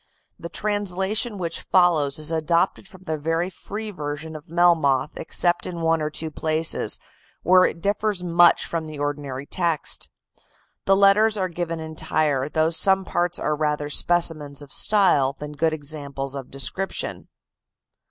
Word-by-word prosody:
The 170 - -7
translation 205 +2 -1
which 170 -3 -2
follows 165 -6 +2
is 155 +1 -2
adopted 170 +4 0
from 185 -3 -16
the 160 -4 -3
very 165 +4 -1
free 215 +4 -7
version 155 -2 -6
of 155 0 -11
Melmoth, 160 -5 +3
except 175 +2 0
in 170 -2 -6
one 165 -1 +2
or 150 - -1
two 155 +1 -4
places, 155 +1 0 0.5
where 185 +1 +6
it 170 - -3
differs 205 -2 0
much 175 0 +4
from 165 -2 -3
the 155 -1 -8
ordinary 145 -2 -4
text. 170 -1 -2 0.8
The 195 - +4
letters 205 +2 +4
are 185 -2 -1
given 170 -1 -4
entire, 155 -3 -1
though 160 +1 +1
some 190 +3 +3
parts 175 0 -1
are 150 - -1
rather 150 -1 -1
specimens 155 -4 +1
of 145 0 -12
style 165 -10 +3
than 150 0 -7
good 160 +2 0
examples 140 -3 -5
of 135 -2 -7
description. 185 +8 -2
165 Hz, 150 wpm, -23 LUFS, 150-180 Hz, 0.8 s, where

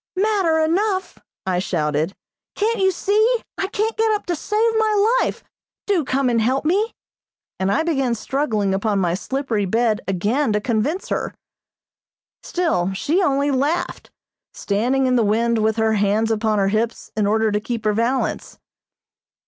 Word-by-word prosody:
"Matter 385 -5 +2
enough!" 375 +5 0 0.3
I 185 -1 0
shouted. 155 -1 -1 0.4
"Can't 445 +2 0
you 380 0 +4
see? 425 +6 +2 0.2
I 385 - 0
can't 435 +2 -1
get 445 0 +2
up 420 - -2
to 350 - -1
save 430 +8 +1
my 435 +2 +3
life. - - -2 0.4
Do 385 -6 +1
come 265 0 0
and 235 -2 +2
help 260 +6 0
me," 405 +8 +1 0.6
and 190 +1 +1
I 205 - +2
began 270 -7 0
struggling 215 -5 -1
upon 200 +1 0
my 175 -3 +1
slippery 225 +1 -2
bed 220 +2 +1
again 210 +7 0
to 210 - +2
convince 245 - -1
her. - - -2 1.1
Still 255 - -1
she 305 - 0
only 285 -3 +1
laughed, 285 +6 -1 0.5
standing 245 +7 0
in 255 -1 +2
the 235 - +3
wind 230 +2 +1
with 220 0 +1
her 220 -1 +1
hands 210 +2 +1
upon 220 -1 +1
her 195 -1 +2
hips 225 +3 -2
in 210 -2 +1
order 220 +1 +2
to 210 - +1
keep 225 0 -5
her 210 - +3
balance. 235 +5 -1
245 Hz, 160 wpm, -21 LUFS, 210-350 Hz, 1.1 s, you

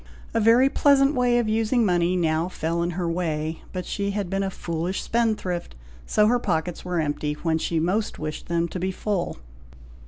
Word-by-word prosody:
A 230 - +2
very 230 +4 +5
pleasant 275 0 +4
way 245 -2 +2
of 240 -2 +1
using 225 +2 +2
money 175 -1 +2
now 165 0 +1
fell 170 -1 -2
in 170 - 0
her 175 -2 -1
way, 160 -2 -2
but 180 -1 -4
she 200 -1 -2
had 200 -2 -3
been 195 0 0
a 195 - 0
foolish 170 0 -3
spendthrift, 215 - -1 0.3
so 210 - +3
her 245 +3 +3
pockets 175 -5 -2
were 180 -1 -1
empty, 150 -1 -1
when 160 -1 +1
she 165 0 0
most 195 +7 0
wished 155 0 -5
them 170 0 0
to 185 - -5
be 185 +2 -1
full. 190 - -2
180 Hz, 190 wpm, -24 LUFS, 170-215 Hz, 0.3 s, very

